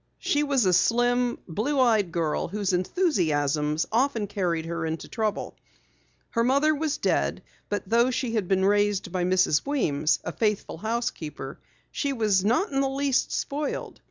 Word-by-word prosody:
She 290 Hz, -, 0 dB
was 280 Hz, -6 st, +2 dB
a 185 Hz, -, +3 dB
slim, 245 Hz, +5 st, +2 dB
blue 235 Hz, -, -1 dB
eyed 220 Hz, -8 st, +3 dB
girl 165 Hz, -3 st, -1 dB
whose 200 Hz, +1 st, -2 dB
enthusiasms 160 Hz, -, +1 dB
often 235 Hz, -2 st, +1 dB
carried 175 Hz, -5 st, -2 dB
her 170 Hz, 0 st, -3 dB
into 160 Hz, 0 st, -4 dB
trouble. 215 Hz, -2 st, -3 dB, 0.8 s
Her 230 Hz, -, +1 dB
mother 280 Hz, +5 st, +3 dB
was 305 Hz, 0 st, -1 dB
dead, -, -, 0 dB, 0.3 s
but 205 Hz, -1 st, -3 dB
though 235 Hz, +4 st, +3 dB
she 250 Hz, -2 st, -2 dB
had 210 Hz, -5 st, 0 dB
been 190 Hz, 0 st, +2 dB
raised 205 Hz, -1 st, +1 dB
by 180 Hz, -1 st, -1 dB
Mrs. 185 Hz, -4 st, +2 dB
Weems, 155 Hz, -, +1 dB
a -, -, -4 dB
faithful 210 Hz, -6 st, -1 dB
housekeeper, 170 Hz, -, -4 dB, 0.3 s
she 280 Hz, -2 st, -1 dB
was 210 Hz, -6 st, +2 dB
not 245 Hz, -, +1 dB
in 270 Hz, 0 st, +1 dB
the 270 Hz, -, +1 dB
least 275 Hz, -1 st, 0 dB
spoiled. 290 Hz, +1 st, -3 dB
210 Hz, 155 wpm, -26 LUFS, 180-260 Hz, 0.8 s, a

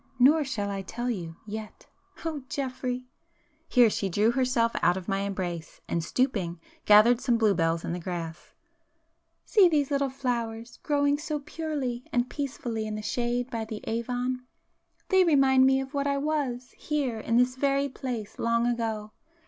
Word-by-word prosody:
Nor 290 Hz, +5 st, +6 dB
shall 210 Hz, -7 st, -3 dB
I 195 Hz, -1 st, -3 dB
tell 240 Hz, +6 st, -3 dB
you—yet. 205 Hz, +3 st, -7 dB, 0.4 s
Oh 310 Hz, -3 st, -2 dB
Geoffrey!—" 255 Hz, -3 st, -3 dB, 0.6 s
Here 245 Hz, -3 st, +6 dB
she 200 Hz, -2 st, -1 dB
drew 210 Hz, +5 st, +3 dB
herself 250 Hz, -2 st, +2 dB
out 175 Hz, +1 st, +3 dB
of 185 Hz, -, -7 dB
my 195 Hz, -1 st, 0 dB
embrace, 180 Hz, -4 st, -4 dB
and 170 Hz, -, -1 dB
stooping, 190 Hz, -6 st, -1 dB, 0.3 s
gathered 225 Hz, +4 st, +7 dB
some 240 Hz, -2 st, +2 dB
bluebells 170 Hz, -7 st, +2 dB
in -, -, -2 dB
the 180 Hz, -, -3 dB
grass—"See 325 Hz, -, -2 dB
these 290 Hz, -3 st, +1 dB
little 280 Hz, -1 st, +1 dB
flowers 235 Hz, -3 st, -3 dB
growing 285 Hz, -1 st, +2 dB
so 305 Hz, 0 st, -2 dB
purely 280 Hz, -6 st, -3 dB
and 245 Hz, 0 st, 0 dB
peacefully 240 Hz, -6 st, -3 dB
in 215 Hz, -, -3 dB
the 215 Hz, -, -5 dB
shade 240 Hz, +3 st, -1 dB
by 230 Hz, -1 st, -2 dB
the 220 Hz, -1 st, -6 dB
Avon!—they 250 Hz, -, -2 dB
remind 270 Hz, -5 st, +5 dB
me 265 Hz, 0 st, +4 dB
of 270 Hz, +1 st, -6 dB
what 280 Hz, 0 st, 0 dB
I 280 Hz, 0 st, +1 dB
was, 275 Hz, -4 st, -2 dB
here 275 Hz, -7 st, -2 dB
in 230 Hz, +2 st, +1 dB
this 250 Hz, +1 st, +3 dB
very 275 Hz, +1 st, +1 dB
place, 240 Hz, -5 st, -6 dB
long 230 Hz, 0 st, +2 dB
ago. 225 Hz, -3 st, -2 dB
245 Hz, 155 wpm, -27 LUFS, 215-275 Hz, 0.6 s, gathered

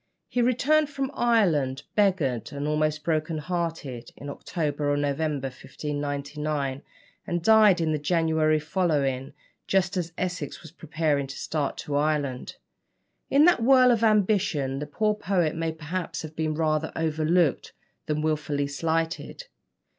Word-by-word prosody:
He 245 Hz, -, 0 dB
returned 280 Hz, +5 st, +3 dB
from 275 Hz, -1 st, -3 dB
Ireland, 160 Hz, -, +2 dB
beggared 170 Hz, -, +1 dB
and 145 Hz, +1 st, -4 dB
almost 155 Hz, 0 st, 0 dB
broken 155 Hz, 0 st, -1 dB
hearted, 155 Hz, -7 st, -4 dB
in 140 Hz, 0 st, -7 dB
October 145 Hz, -2 st, -2 dB
or 145 Hz, -, +1 dB
November 145 Hz, 0 st, -1 dB
1599, 145 Hz, 0 st, -4 dB, 0.5 s
and 175 Hz, -1 st, -2 dB
died 215 Hz, -3 st, +6 dB
in 160 Hz, -1 st, +1 dB
the 155 Hz, -, 0 dB
January 160 Hz, -1 st, +2 dB
following, 145 Hz, -6 st, -1 dB, 0.3 s
just 190 Hz, 0 st, +1 dB
as 170 Hz, -2 st, -2 dB
Essex 175 Hz, -5 st, -4 dB
was 160 Hz, -, -11 dB
preparing 155 Hz, -4 st, -1 dB
to 135 Hz, -, -8 dB
start 150 Hz, -3 st, -2 dB
to 145 Hz, -, -4 dB
Ireland. 145 Hz, -3 st, -1 dB, 0.7 s
In 285 Hz, +3 st, +5 dB
that 350 Hz, -8 st, +4 dB
whirl 255 Hz, +1 st, +6 dB
of 230 Hz, -1 st, +1 dB
ambition, 190 Hz, -11 st, +2 dB
the 150 Hz, -, -5 dB
poor 210 Hz, +8 st, +1 dB
poet 180 Hz, -6 st, 0 dB
may 165 Hz, 0 st, -1 dB
perhaps 160 Hz, +3 st, -5 dB
have 155 Hz, 0 st, -8 dB
been 155 Hz, -1 st, -1 dB
rather 155 Hz, 0 st, 0 dB
overlooked 160 Hz, 0 st, +1 dB, 0.4 s
than 150 Hz, 0 st, -1 dB
wilfully 150 Hz, -2 st, 0 dB
slighted. 165 Hz, -, -2 dB
155 Hz, 140 wpm, -26 LUFS, 145-180 Hz, 0.7 s, died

